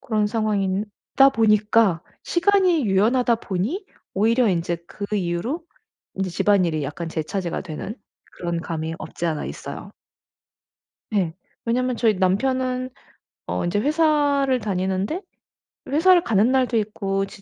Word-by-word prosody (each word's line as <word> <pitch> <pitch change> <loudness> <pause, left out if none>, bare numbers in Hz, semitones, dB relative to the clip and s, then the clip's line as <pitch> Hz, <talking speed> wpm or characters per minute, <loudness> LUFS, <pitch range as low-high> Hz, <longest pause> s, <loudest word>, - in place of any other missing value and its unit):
그런 215 -5 0
상황인 205 -3 0 0.3
다 270 0 +8
보니까 215 -5 +3 0.2
시간이 360 - +3
유연하다 230 +5 +3
보니 225 - -3 0.3
오히려 225 +4 +3
인제 170 -1 0
그 200 - -6
이유로 195 - -2 0.5
인제 190 -1 -2
집안일이 175 -4 +2
약간 160 +4 -4
제 160 -1 -2
차지가 175 +2 -3
되는 185 +5 -6 0.4
그런 170 -1 -3
감이 165 -1 -4
없지 170 - -5
않아 155 -2 -2
있어요. - - -8 1.2
네. 190 -7 0 0.3
왜냐면 250 +1 0
저희 220 -3 +3
남편은 255 +7 0 0.6
어 - - -2
인제 175 +4 0
회사를 290 -2 +2
다니는데 190 - -1 0.7
회사를 345 +5 +5
가는 220 +3 +3
날도 255 -3 +2
있고 195 -2 -1
지 195 0 -13
210 Hz, 280 characters per minute, -23 LUFS, 185-255 Hz, 1.2 s, 다